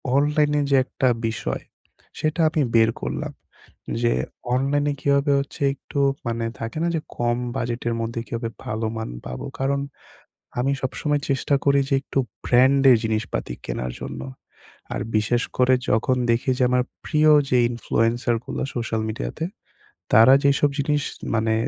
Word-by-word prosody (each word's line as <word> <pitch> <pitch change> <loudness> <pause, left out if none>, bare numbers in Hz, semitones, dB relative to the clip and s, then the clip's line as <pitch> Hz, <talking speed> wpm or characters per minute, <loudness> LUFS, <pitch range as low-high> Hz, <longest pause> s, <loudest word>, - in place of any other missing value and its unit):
Online 150 +1 +3 0.2
যে 140 - +4
একটা 130 - -1 0.2
বিষয়, 115 - -3 0.6
সেটা 155 +2 -1
আমি 155 -1 0
বের 115 0 +6
করলাম। - - -3 0.7
যে 120 - +3 0.4
অনলাইনে 145 +2 +1
কিভাবে 140 +1 +2
হচ্ছে 140 +1 -6
একটু 140 +1 -6 0.3
মানে 115 0 -1
থাকে 115 +5 -5
না? - - +2
যে, - - +1 0.2
কম 120 0 +1 0.2
বাজেটের 120 0 -2
মধ্যে 115 +1 -3
কিভাবে 115 +1 -3 0.2
ভালোমান 110 +1 -3 0.2
পাবো। 60 0 -6 0.2
কারণ 140 +1 +1 0.8
আমি 135 +3 +1
সবসময় 145 +3 -1
চেষ্টা 135 +1 +1
করি 140 0 +4
যে - - +3
একটু 135 - -3 0.3
ব্র্যান্ডের 130 +1 +5
জিনিসপাতি 110 - -2
কেনার 60 0 -3
জন্য - - -6 0.7
আর - - -2 0.2
বিশেষ 115 +3 +1 0.2
করে 130 0 +5 0.2
যখন 120 +4 +2
দেখি 115 +3 +1
যে - - +1
আমার 125 0 +3 0.2
প্রিয় 155 -1 +3 0.2
যে 125 - +4
ইনফ্লুয়েন্সার 120 0 0
গুলো - - -3
সোশ্যাল 115 -2 -2
মিডিয়াতে 65 - -4 0.7
তারা 115 +4 +8
যেইসব 140 +1 +4
জিনিস 145 +1 +1 0.3
মানে 110 0 +1
125 Hz, 140 wpm, -23 LUFS, 115-140 Hz, 0.8 s, তারা